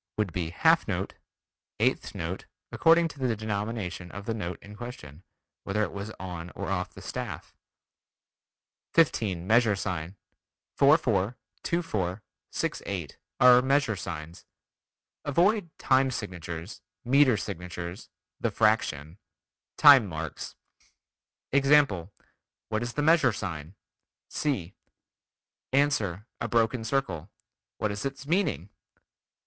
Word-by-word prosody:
would 105 -6 -1
be 85 -3 -2
"half 85 - +3
note," - - -2 0.7
"eighth - - 0
note" 85 +3 -4 0.3
according 165 0 +5
to 145 -3 -12
the 125 -3 +1
denomination 105 -4 -4
of 100 +2 -8
the 115 - -1
note 90 -5 -4
in 105 +1 -11
question, 95 - -9 0.4
whether 105 +2 0
it 100 - -2
was 100 +2 -6
on 90 -2 -6
or - - -4
off 90 -2 -2
the - - -10
staff. - - -6 1.4
15. 105 - +2
Measure 110 0 +4
sign: 90 -1 -4 0.6
4 140 +3 +6
4, 110 - 0 0.2
2 170 +1 0
4, 95 - -2 0.3
6 - - -2
8, 90 -8 -5 0.2
are 125 0 +8
measure 135 -4 +2
signs. 85 -2 -7 0.8
Avoid 175 +6 +2
"time 130 0 +3
signatures," 85 -6 -6 0.2
"meter 130 -2 +5
signatures," 90 0 -6 0.3
"the - - 0
fraction," 95 -7 +1 0.6
"time 140 -7 +8
marks." 80 -2 -6 1.0
Example: 135 - +4 0.6
What 110 0 -1
is 120 0 -3
the 145 - -1
measure 160 -3 +5
sign? 85 -4 -5 0.5
(C) 100 - -2 1.0
Ans. 140 -1 +3
A 105 +4 -5
broken 115 0 +2
circle. 110 - -2 0.5
What 105 - -1
is 100 0 -4
its 135 0 -5
meaning? 145 - 0
105 Hz, 120 wpm, -28 LUFS, 90-130 Hz, 1.4 s, are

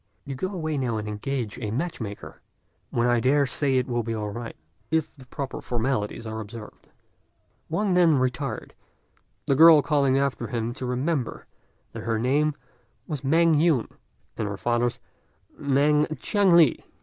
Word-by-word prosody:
You 140 - -5
go 135 +8 -3
away 155 -6 -2
now 120 -4 -1
and 105 0 -4
engage 105 +1 -4
a 110 -4 -3
match 140 +7 -3
maker, 105 -2 -8 0.5
when 120 - 0
I 120 -1 +3
dare 140 +4 +3
say 135 0 0
it 125 - +1
will 120 -2 -1
be 115 0 -3
all 105 -1 -3
right 115 +2 -7 0.3
if 160 -1 -1
the 130 -3 -15
proper 135 +1 -5
formalities 115 -2 -2
are 110 0 -5
observed." 110 0 -10 0.8
Wang 185 +4 0
then 170 -4 +5
retired, 125 -1 -2 0.7
the - - +2
girl 155 +1 +8
calling 140 -3 +2
after 135 -3 -1
him 115 0 -3
to 130 0 -5
remember 130 +1 -2 0.5
that - - -7
her 115 -1 -1
name 140 +6 +1 0.5
was 150 -5 -4
Mêng 165 +4 +3
Yün, 150 -6 +2 0.5
and 110 - -1
her 100 -1 -4
father's 120 +2 0 0.6
Mêng 145 +2 +3
Chiang 200 -4 +2
li. 160 -7 +5
130 Hz, 160 wpm, -25 LUFS, 115-150 Hz, 0.8 s, girl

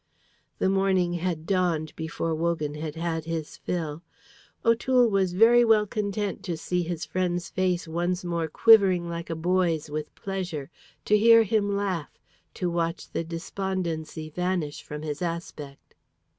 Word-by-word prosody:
The - - +1
morning 190 -2 +2
had 170 -2 -2
dawned 170 -5 0
before 160 0 -3
Wogan 160 -2 -1
had 150 0 -5
had 165 -1 -2
his 165 -2 -4
fill. 160 -3 -3 0.6
O'Toole 240 +2 +4
was 195 -4 +1
very 230 +5 +6
well 220 -2 +4
content 205 -2 -3
to 175 -4 -2
see 180 +2 -1
his 170 -1 -3
friend's 180 -1 -2
face 180 -2 0
once 175 +2 -1
more 170 -2 -1
quivering 190 -1 +5
like 170 0 -5
a 165 - -2
boy's 165 -2 0
with 150 0 -5
pleasure, 180 -8 -4 0.3
to 210 - +4
hear 230 +1 +7
him 205 -1 +1
laugh, 185 -7 -3 0.4
to 180 - -1
watch 170 0 -2
the - - -2
despondency 165 -2 -4
vanish 180 -3 -2
from 150 +1 -7
his 150 0 -4
aspect. 165 -5 -6
175 Hz, 145 wpm, -26 LUFS, 160-190 Hz, 0.6 s, hear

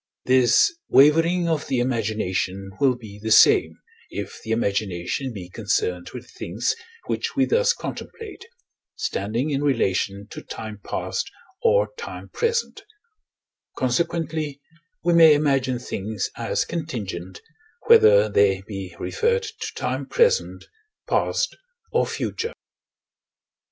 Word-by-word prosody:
This 130 - +4 0.2
wavering 165 +5 +5
of 160 -3 -1
the 130 - 0
imagination 100 -5 -1
will 135 -3 +3
be 105 -4 -11
the 110 - -3
same, 80 -6 +6 0.3
if - - -6
the 110 - -9
imagination 100 +2 -1
be 95 -6 -8
concerned 90 -3 -2
with - - -9
things 105 +8 -2 0.3
which - - -3
we 270 -1 +3
thus 485 - +3
contemplate, 450 -2 -8 0.5
standing 115 +9 -2
in 140 0 0
relation 100 -6 0
to - - -7
time 110 -2 -8
past - - -3 0.3
or 480 +2 +3
time 470 - -8
present: 465 -2 -1 1.0
consequently, 155 +2 -1 0.4
we 175 +1 +3
may 165 -2 +8
imagine 135 -4 +1
things 105 -4 -4
as - - -1
contingent, 100 - -5 0.5
whether 105 0 +7
they 100 -2 +2
be 95 -4 -7
referred 470 0 0
to 445 0 -6
time - - -3
present, 475 0 +1 0.4
past, - - 0 0.4
or - - +2
future. 455 +2 -3
125 Hz, 115 wpm, -23 LUFS, 100-165 Hz, 1.0 s, may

